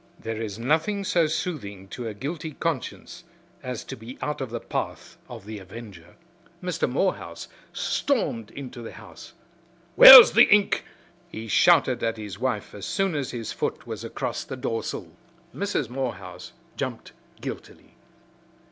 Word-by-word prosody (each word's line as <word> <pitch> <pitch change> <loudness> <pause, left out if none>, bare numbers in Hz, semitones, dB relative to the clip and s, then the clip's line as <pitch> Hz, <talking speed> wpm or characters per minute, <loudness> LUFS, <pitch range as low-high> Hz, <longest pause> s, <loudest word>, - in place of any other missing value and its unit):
There 115 0 -5
is 105 -3 -5
nothing 160 - 0
so 175 -5 +2
soothing 105 - -4
to 120 +2 -6
a 110 - -6
guilty 155 +6 -5
conscience 165 +3 -4 0.4
as 125 -4 -5
to - - -8
be 115 +4 -11
out 150 -1 -3
of 130 - -4
the 120 +1 -4
path - - -5
of - - -10
the 110 -1 -7
avenger. 95 -3 -12 0.4
Mr. - - -2
Morehouse - - -2 0.2
stormed 115 -2 -1
into 125 -1 -9
the 115 - -8
house. - - -13 0.6
"Where's 260 -3 +12
the 235 - +7
ink?" 205 -1 +3 0.4
he 110 +1 -8
shouted 135 +1 +4
at 115 0 -1
his 105 -3 -8
wife 125 -5 -2
as 100 - -7
soon 195 -2 0
as 145 -3 -2
his 115 -3 -5
foot - - -3
was - - -6
across - - -4
the 130 - -7
doorsill. 115 -3 -4 0.4
Mrs. 200 - -1
Morehouse 110 -8 -6 0.2
jumped, - - -5 0.3
guiltily. - - -9
125 Hz, 145 wpm, -25 LUFS, 110-160 Hz, 0.6 s, Where's